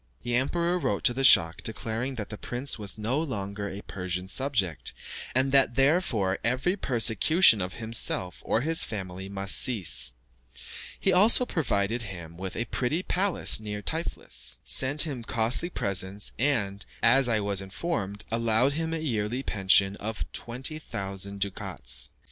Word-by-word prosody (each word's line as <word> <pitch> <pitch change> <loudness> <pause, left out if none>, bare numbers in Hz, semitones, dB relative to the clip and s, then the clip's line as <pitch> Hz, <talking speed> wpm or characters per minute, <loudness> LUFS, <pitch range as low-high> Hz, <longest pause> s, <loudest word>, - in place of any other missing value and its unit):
The 120 - -3
emperor 170 +8 +1
wrote 130 - -1
to 120 - +4
the 135 +2 -2
schach 80 -10 +6
declaring 115 +4 -3
that 105 -4 -5
the 105 - -7
prince 125 0 -1
was 100 -1 -2
no 115 +7 -1
longer 100 -8 -4
a 100 +2 -8
Persian 90 -1 -4
subject, 105 - +1 0.4
and 130 +1 +3
that 135 -3 +4
therefore 135 - +2
every 130 - +3
persecution 125 - +3
of 90 +1 -4
himself 110 - 0
or 115 - +1
his 160 +4 +3
family 95 -2 -5
must 100 0 -1
cease; 95 - +1 0.9
he 190 - +3
also 215 +7 +5
provided 115 - -1
him 85 -6 -8
with 95 +2 -6
a 120 - -2
pretty 130 +10 -1
palace 190 - +1
near 105 -1 -6
Tiflis, 160 +7 -4
sent 135 +3 +4
him 140 -7 -4
costly 120 +9 0
presents, 100 - -2
and, 105 -7 0 0.2
as 125 +2 +5
I 110 -2 +2
was 100 -1 -1
informed, 100 - -4
allowed 115 +3 +2
him 160 +2 -2
a - - -1
yearly 120 -4 -2
pension 95 -2 +3
of 110 +1 -4
20,000 100 -7 -3
ducats. 70 -10 -3
115 Hz, 150 wpm, -27 LUFS, 100-135 Hz, 0.9 s, schach